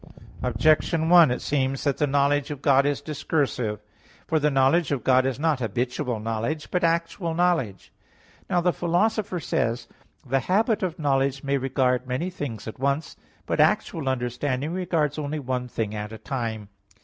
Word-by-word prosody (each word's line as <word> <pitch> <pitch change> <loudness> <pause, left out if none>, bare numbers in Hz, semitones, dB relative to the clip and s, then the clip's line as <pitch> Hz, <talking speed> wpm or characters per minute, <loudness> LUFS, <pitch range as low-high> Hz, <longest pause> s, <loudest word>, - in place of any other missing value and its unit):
Objection 160 +1 +2
1: 170 -4 +8
It 125 - -2
seems 135 -2 -1
that 140 -2 0
the 150 - +1
knowledge 140 0 +2
of 145 -2 -7
God 140 0 +4
is 145 -1 -1
discursive. 135 -8 -2 0.4
For 160 - +1
the 150 0 +2
knowledge 135 +4 +3
of 135 -6 -1
God 130 0 +4
is 130 -3 -2
not 155 -3 +1
habitual 120 +1 -2
knowledge, 115 +8 -3
but 180 - 0
actual 165 0 0
knowledge. 165 - 0 0.6
Now 175 - +2
the 175 0 +2
Philosopher 180 +2 0
says 115 -5 -1
(Topic. - - -29 0.3
ii): - - -17
"The 135 - +3
habit 215 - +1
of 180 -2 -2
knowledge 135 -3 0
may 140 0 0
regard 130 -1 0
many 130 +9 -2
things 125 - -6
at 110 - -7
once; 140 +3 -1 0.3
but - - -2
actual 150 -5 +2
understanding 130 +4 -2
regards 160 -5 -1
only 150 +1 -3
one 125 -3 -3
thing 110 -3 -3
at 105 0 -5
a 110 - -7
time." 110 -5 -4
140 Hz, 175 wpm, -25 LUFS, 125-160 Hz, 0.6 s, 1